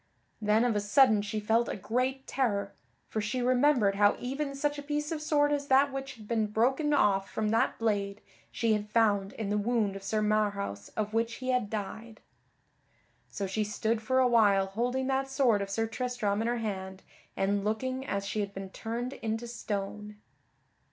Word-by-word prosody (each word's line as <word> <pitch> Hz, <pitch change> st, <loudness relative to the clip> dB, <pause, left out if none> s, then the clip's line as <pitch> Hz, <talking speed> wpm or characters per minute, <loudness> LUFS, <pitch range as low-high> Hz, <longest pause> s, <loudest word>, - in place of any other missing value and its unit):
Then 215 Hz, +2 st, +3 dB
of 235 Hz, -3 st, +1 dB
a -, -, +2 dB
sudden 210 Hz, +1 st, +4 dB
she 210 Hz, +1 st, -3 dB
felt 225 Hz, +3 st, +1 dB
a -, -, -2 dB
great 255 Hz, +6 st, -1 dB
terror, 200 Hz, -7 st, -1 dB, 0.3 s
for 215 Hz, -, -2 dB
she 215 Hz, +5 st, -2 dB
remembered 250 Hz, -5 st, +3 dB
how 205 Hz, 0 st, +5 dB
even 275 Hz, +3 st, -3 dB
such 290 Hz, +1 st, -1 dB
a -, -, -4 dB
piece 295 Hz, +1 st, -2 dB
of 315 Hz, -2 st, -3 dB
sword 295 Hz, -1 st, +2 dB
as 285 Hz, -1 st, -1 dB
that 275 Hz, +1 st, +4 dB
which 270 Hz, 0 st, -5 dB
had 215 Hz, -3 st, -13 dB
been 220 Hz, -2 st, +1 dB
broken 260 Hz, +8 st, +1 dB
off 195 Hz, -9 st, +3 dB
from 215 Hz, -1 st, -1 dB
that 225 Hz, +1 st, +1 dB
blade, 205 Hz, -3 st, -1 dB, 0.3 s
she 230 Hz, -2 st, +1 dB
had 210 Hz, 0 st, -2 dB
found 205 Hz, -3 st, +2 dB
in 210 Hz, -3 st, -4 dB
the 210 Hz, -, +1 dB
wound 215 Hz, -2 st, 0 dB
of 195 Hz, -, -6 dB
Sir 215 Hz, +2 st, -1 dB
Marhaus 200 Hz, -, -1 dB
of 215 Hz, 0 st, -2 dB
which 230 Hz, +1 st, 0 dB
he 255 Hz, 0 st, -5 dB
had 250 Hz, -5 st, +1 dB
died. 220 Hz, +2 st, -6 dB, 1.1 s
So 200 Hz, -, -4 dB
she 215 Hz, +3 st, -1 dB
stood 220 Hz, +2 st, -1 dB
for 260 Hz, +4 st, 0 dB
a 260 Hz, -1 st, +5 dB
while 205 Hz, -5 st, +4 dB
holding 245 Hz, +7 st, -1 dB
that 270 Hz, 0 st, 0 dB
sword 260 Hz, -7 st, +2 dB
of 200 Hz, -, -4 dB
Sir 225 Hz, +3 st, 0 dB
Tristram 225 Hz, -3 st, -2 dB
in 225 Hz, -, -1 dB
her 240 Hz, 0 st, 0 dB
hand 190 Hz, -4 st, -5 dB, 0.3 s
and 200 Hz, +1 st, +1 dB
looking 255 Hz, +5 st, -2 dB
as 200 Hz, -7 st, -3 dB
she 210 Hz, +2 st, -3 dB
had 200 Hz, -1 st, -3 dB
been 195 Hz, -1 st, -6 dB
turned 235 Hz, +5 st, -4 dB
into 225 Hz, -1 st, -3 dB
stone. 210 Hz, -2 st, -5 dB
220 Hz, 190 wpm, -30 LUFS, 205-255 Hz, 1.1 s, how